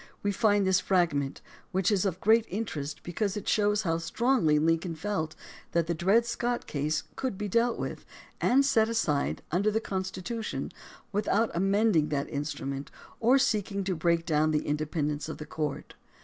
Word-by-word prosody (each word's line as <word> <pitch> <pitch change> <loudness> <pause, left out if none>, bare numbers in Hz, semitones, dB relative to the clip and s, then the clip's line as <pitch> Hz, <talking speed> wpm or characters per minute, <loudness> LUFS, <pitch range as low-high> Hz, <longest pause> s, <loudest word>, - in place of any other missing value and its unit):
we 205 - +1
find 205 -1 +3
this 190 -1 +4
fragment, 160 -7 0 0.3
which 190 +2 +1
is 200 -1 +2
of 185 -2 -1
great 225 +3 +4
interest 160 -8 -4
because 200 +3 -2
it 205 - -6
shows 210 0 +2
how 165 -3 0
strongly 165 - +2
Lincoln 165 +2 +1
felt 160 -2 -3 0.4
that 170 -1 +2
the 170 - -1
Dred 195 +8 +3
Scott 240 0 -2
case 150 +1 -1
could 255 -7 -3
be 210 - -3
dealt 230 +4 +2
with, - - -5 0.4
and 275 +3 +4
set 225 -5 +3
aside 155 -11 0
under 195 +6 +2
the 215 +1 +1
Constitution 195 +3 -4 0.4
without 210 +2 +1
amending 195 -2 +2
that 140 -2 -1
instrument 140 -1 -4 0.3
or 245 +4 +5
seeking 210 -7 0
to 185 -1 -1
break 170 +1 +1
down 155 -2 +2
the 150 -1 0
inde 150 +1 -1
pendence 150 -1 -1
of - - -5
the 150 - -7
courts. 150 -1 -4
185 Hz, 170 wpm, -29 LUFS, 155-215 Hz, 0.4 s, or